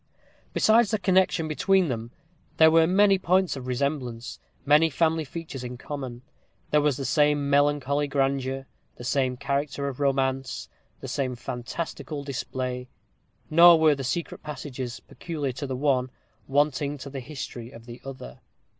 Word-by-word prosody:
Besides 220 0 +4
the 215 - +1
connexion 185 -4 +2
between 185 +5 +2
them, 115 -3 -4 0.5
there 160 0 +7
were 165 0 +5
many 195 +1 +4
points 185 -1 +2
of 130 -2 -7
resemblance; 125 -2 -3 0.3
many 150 +3 +5
family 160 +2 +1
features 150 -3 -7
in 125 0 -6
common; 130 -3 -6 0.5
there 150 - +4
was 145 -3 +1
the 135 - -4
same 145 -1 +2
melancholy 145 0 +2
grandeur, 135 -1 -1 0.3
the - - -10
same 130 0 0
character 140 +1 -2
of 135 -1 -5
romance, 135 -5 -1 0.3
the 135 - -6
same 130 -1 -2
fantastical 140 +5 -5
display. 130 -2 -4 0.6
Nor 170 +1 +8
were 155 -1 +5
the 135 -1 -4
secret 170 +6 -3
passages, 130 -5 -6
peculiar 150 -5 -4
to 130 +3 -5
the 130 - -3
one, 130 -2 +1 0.4
wanting 145 +1 +1
to 140 0 -9
the 135 - -5
history 130 -3 -7
of 115 -2 -13
the 120 0 -10
other. 130 - -9
140 Hz, 150 wpm, -26 LUFS, 130-155 Hz, 0.6 s, Nor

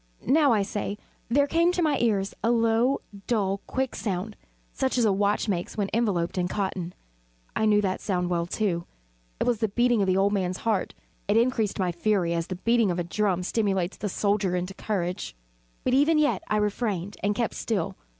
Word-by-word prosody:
now, 290 -1 +4
I 210 -3 +3
say, 205 0 -3 0.3
there 280 +4 +4
came 335 +4 +3
to 360 - +1
my 295 -4 +2
ears 205 -4 +1
a 230 - +3
low, 235 +3 +2 0.3
dull, 200 -4 0
quick 265 -1 -2
sound, 205 +1 -3 0.4
such 265 -1 0
as 240 - +3
a 205 - +3
watch 205 +3 +1
makes 180 -1 -2
when 200 -2 -1
enveloped 195 -6 0
in 180 - +1
cotton. 185 -2 -3 0.6
I 220 - +1
knew 210 -1 +4
that 190 -2 -1
sound 180 -3 -1
well, 170 -1 0
too. 175 -3 -1 0.5
It - - +2
was 240 -3 +1
the 220 - +1
beating 240 +2 +2
of 195 - +1
the 185 0 +2
old 200 +1 +3
man's 185 -2 -1
heart. 215 -5 0 0.3
It 205 +2 +3
increased 230 -3 +1
my 185 -2 0
fury, 175 -1 +1
as 170 -1 -2
the 185 - -4
beating 230 +2 +2
of 175 - -1
a 175 - 0
drum 185 0 0
stimulates 195 -2 0
the 205 - -3
soldier 200 -1 0
into 180 +2 -3
courage. 185 - -3 0.5
But 250 - +1
even 295 +4 +4
yet 300 -1 +2
I 215 - +1
refrained 205 -2 -1
and 205 +1 +1
kept 235 0 -1
still. 200 -8 -2
205 Hz, 200 wpm, -26 LUFS, 185-230 Hz, 0.6 s, now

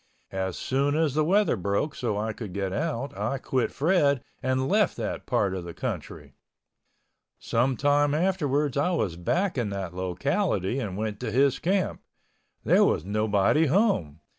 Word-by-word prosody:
As 95 -1 -3
soon 140 +2 0
as 155 -3 +1
the 155 +1 +2
weather 200 +3 +3
broke 100 - -1
so 110 -5 -2
I 110 +1 -2
could 110 -6 -7
get 95 -1 -2
out 145 -1 -2
I 135 - -2
quit 130 -1 -1
Fred 145 -4 +2 0.2
and 130 +1 0
left 205 +2 +2
that - - -4
part 100 -2 +1
of 95 -2 -4
the 85 -1 -8
country. - - -5 1.0
Some 125 +2 0
time 145 0 +2
afterwards 150 -6 0
I 145 +5 +2
was 100 - -1
back 170 - 0
in 115 -4 -1
that 95 -3 -4
locality 95 - -1
and 100 -7 -4
went 105 -1 -3
to - - -3
his 135 +1 +3
camp. 190 +1 0 0.6
There - - +5
was 80 - +1
nobody 105 +8 +2
home. 120 - +1
130 Hz, 165 wpm, -26 LUFS, 100-150 Hz, 1.0 s, There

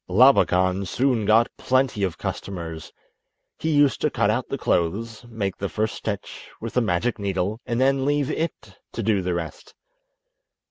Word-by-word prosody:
Labakan 95 -4 +4
soon 125 -1 +1
got 110 +3 +4
plenty 130 -4 +1
of 95 -3 -1
customers. 80 -4 -5 0.7
He 160 - -1
used 145 -3 +3
to - - +2
cut - - +1
out - - -2
the - - -2
clothes, 110 +8 -1
make 100 -5 -3
the 100 - -3
first 110 +1 -1
stitch 100 -3 -6
with 115 0 -6
the 125 - +3
magic 110 +2 0
needle, 100 +2 -2
and 120 0 -1
then 135 +1 +3
leave 145 0 +1
it 135 - -4
to 115 - -3
do 105 -2 +2
the 90 -1 -1
rest. 85 -2 -6
110 Hz, 165 wpm, -24 LUFS, 95-125 Hz, 0.7 s, Labakan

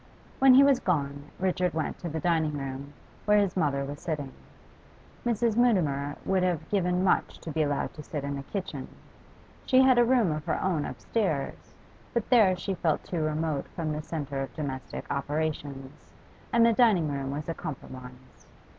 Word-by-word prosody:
When 265 -1 +7
he 275 - +9
was 275 -2 +5
gone, 145 - -1
Richard 185 -2 0
went 160 - -2
to 175 - -4
the 160 +1 -3
dining 160 -2 +1
room, 135 +1 -6 0.3
where 210 0 +5
his 200 -3 +2
mother 140 -6 +1
was 145 +1 -6
sitting. 145 -5 -3 0.9
Mrs. 235 -1 +1
Mutimer 150 - +2
would 190 -1 +2
have 180 -4 0
given 180 -2 +1
much 190 - +1
to 160 - -7
be 155 - 0
allowed 145 -2 -1
to 150 - -9
sit 150 -1 -5
in 140 0 -3
the 140 - -4
kitchen; 190 +7 -5 0.8
she 260 0 +5
had 260 -2 +5
a - - +7
room 235 -7 +3
of 155 0 -3
her 165 - 0
own 170 -6 0
upstairs, 185 -12 -3 0.4
but 235 - 0
there 205 -7 +6
she 195 +2 -3
felt 165 -4 0
too 170 -3 -3
remote 155 -1 -1
from 160 -3 -2
the 150 - -3
centre 145 -4 -4
of 135 -3 -6
domestic 135 -4 -5
operations, 145 -1 -3 0.5
and 230 0 +5
the 230 - +5
dining 210 -9 +4
room 140 -2 -3
was 145 +2 -4
a 165 - -1
compromise. 130 -4 -9
160 Hz, 180 wpm, -28 LUFS, 140-190 Hz, 0.9 s, he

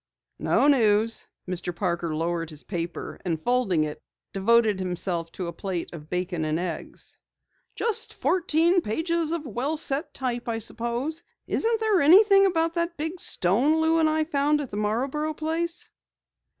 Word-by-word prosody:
"No - - +3
news." 225 -5 +3 0.2
Mr. 180 -1 -4
Parker 170 -3 -1
lowered 165 0 -2
his 155 -2 -7
paper, 170 -2 -5
and 165 -4 -1
folding 200 -5 +1
it, 150 -1 -5 0.3
devoted 215 0 +3
himself 175 -2 -2
to 185 - -4
a 170 - -5
plate 180 -2 -4
of 155 -2 -10
bacon 180 -2 -2
and 155 0 0
eggs. 175 -2 -5 0.6
"Just 460 -3 -1
fourteen 345 0 +2
pages 325 +7 -1
of 335 -2 -2
well 265 +6 -2
set 295 +1 -2
type, 245 -2 -2
I 225 - -1
suppose. 240 +8 -2 0.2
Isn't 455 0 +1
there 435 -4 +2
anything 390 +6 +7
about 330 -2 +1
that 340 0 -2
big 320 +4 -3
stone 250 - +2
Lou 320 +1 +3
and 315 -1 +4
I 310 0 +1
found 295 -1 +1
at 280 -4 -5
the - - -5
Marborough 270 +9 -1
place?" 325 +2 -2
245 Hz, 155 wpm, -26 LUFS, -, 0.6 s, anything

